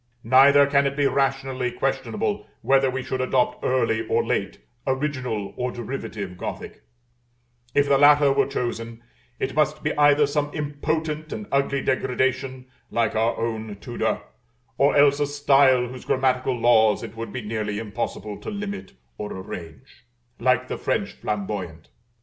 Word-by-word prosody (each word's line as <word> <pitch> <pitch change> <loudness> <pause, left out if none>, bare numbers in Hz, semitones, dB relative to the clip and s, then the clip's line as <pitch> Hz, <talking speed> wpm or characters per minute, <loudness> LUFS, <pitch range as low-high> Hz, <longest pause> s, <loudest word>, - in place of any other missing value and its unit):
Neither 140 +4 +6
can 140 0 +3
it 140 +1 -4
be 145 - +2
rationally 135 -2 0
questionable - - -2 0.2
whether 135 0 +4
we 130 0 -3
should 130 0 -3
adopt 125 -1 0
early 125 -3 +1
or - - +1
late, - - -1 0.3
original 130 -6 -2
or 125 0 -2
derivative 110 -6 -6
Gothic: - - -6 0.9
if 145 0 +4
the 140 -1 +4
latter 145 -1 +6
were - - +2
chosen, 115 -3 -4 0.4
it - - -2
must - - +1
be - - -1
either 145 0 +5
some 145 +1 -1
impotent 155 +1 -3
and 215 - -5
ugly 140 0 +1
degradation, 130 0 -1 0.2
like 115 -2 0
our 110 +2 +1
own 110 -2 -3
Tudor, 120 -1 -2 0.5
or 140 +4 +3
else 140 0 +5
a 145 - +1
style 140 -3 +4
whose 125 0 -9
grammatical 130 -1 +1
laws 110 -3 +4
it 115 -1 -8
would 115 0 -6
be 130 - -4
nearly 105 -1 -3
impossible 105 -1 -4
to - - -7
limit 205 -1 -5 0.3
or 105 - -4
arrange, 85 - -9 0.3
like 125 +1 +2
the - - -5
French - - -1
Flamboyant. 95 -6 -5
130 Hz, 150 wpm, -24 LUFS, 115-140 Hz, 0.9 s, Neither